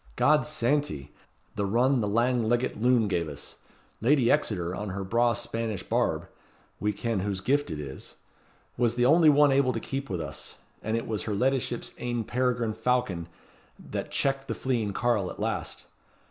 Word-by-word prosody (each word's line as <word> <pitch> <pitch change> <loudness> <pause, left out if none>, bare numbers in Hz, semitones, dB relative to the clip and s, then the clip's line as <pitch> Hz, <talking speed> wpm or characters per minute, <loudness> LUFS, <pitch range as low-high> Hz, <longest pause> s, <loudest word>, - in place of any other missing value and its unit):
God's 150 0 +4
santy! 130 - -1 0.4
the 105 - -1
run 125 +5 +3
the 105 - 0
lang 115 +2 +2
leggit 120 -2 0
loon 120 -2 +4
gave 85 -5 -1
us. 70 -1 -8 0.4
Lady 125 0 +4
Exeter, 90 - +1
on 105 +1 -4
her 95 +1 -4
braw 115 +5 +2
Spanish 115 -3 -3
barb - - 0 0.5
we 105 - +1
ken 115 0 -2
whose 100 0 -1
gift 140 +8 +1
it 75 - -4
is 70 -3 -8 0.6
was 120 -1 +2
the 120 - +2
only 160 +4 +6
one 145 -1 +6
able 135 -1 +3
to - - -2
keep 135 0 -4
with 90 -3 -2
us; - - -6 0.3
and 110 +1 -1
it 115 - -3
was 110 -2 -2
her 105 - -1
leddyship's 125 +1 0
ain 120 -1 -2
peregrine 125 -2 0
falcon 110 -7 0 0.5
that - - -5
checked 135 0 0
the - - -2
fleeing 120 -6 -1
carle 105 -4 +1
at - - -9
last. - - -3
120 Hz, 175 wpm, -28 LUFS, 105-130 Hz, 0.6 s, only